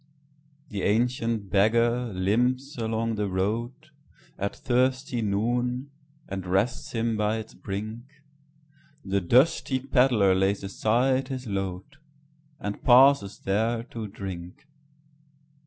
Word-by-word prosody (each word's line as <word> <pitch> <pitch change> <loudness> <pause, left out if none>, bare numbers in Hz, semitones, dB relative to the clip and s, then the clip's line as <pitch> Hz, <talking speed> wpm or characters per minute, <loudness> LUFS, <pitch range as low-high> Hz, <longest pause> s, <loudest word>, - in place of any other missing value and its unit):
The 100 -2 -4
ancient 115 -1 0
beggar 115 +4 +2
limps 125 +9 0
along 115 -1 -2
the 105 -1 -1
roadAt 115 +3 -5
thirsty 130 -1 0
noon, 120 +6 -1 0.4
and 95 -1 -5
rests 125 +11 0
him 115 -1 0
by 105 +1 0
its 110 0 -8
brink; 110 +4 -6 1.0
The 100 0 0
dusty 130 - +3
pedlar 125 -7 +3
lays 95 +2 +1
aside 125 +7 +1
his 130 -1 -5
load, 95 +5 -4 0.6
And 105 0 -5
pauses 130 -5 +5
there 115 +4 0
to 115 -2 -4
drink. 95 +1 -8
115 Hz, 105 wpm, -26 LUFS, 100-125 Hz, 1.0 s, pauses